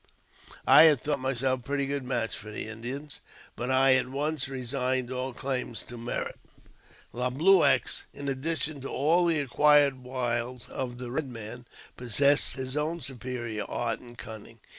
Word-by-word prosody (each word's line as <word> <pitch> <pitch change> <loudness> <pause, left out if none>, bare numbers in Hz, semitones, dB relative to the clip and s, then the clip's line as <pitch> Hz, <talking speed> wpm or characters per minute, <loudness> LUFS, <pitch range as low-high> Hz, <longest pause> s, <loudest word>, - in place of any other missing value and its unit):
I 160 - +9
had 150 -5 +6
thought 145 -1 -1
myself 130 0 0
a - - -17
pretty 140 +1 -1
good 140 0 -2
match 125 -3 -2
for 105 - -8
the 105 - -5
Indians, 125 +6 -5 0.4
but 125 - -4
I 130 0 +5
at 130 -1 +2
once 145 0 -1
resigned 130 -1 -1
all 130 +1 -3
claims 125 -2 -3
to 120 - -10
merit. 120 0 -4 0.7
Le 125 +1 -1
Blueux, 150 +2 +5 0.3
in 140 - -7
addition 150 +1 -2
to 135 - -5
all 170 +5 +2
the 165 -3 +2
acquired 145 0 +4
wiles 125 -1 -3
of 125 -2 -4
the 125 0 -6
Eed 145 -3 -1
Man, 120 +1 -9 0.3
possessed 140 +4 +2
his 130 0 -4
own 155 +3 -1
superior 120 -5 -4
art 115 -2 -2
and 120 -1 -14
cunning. 110 +1 -10
130 Hz, 160 wpm, -28 LUFS, 120-140 Hz, 0.7 s, I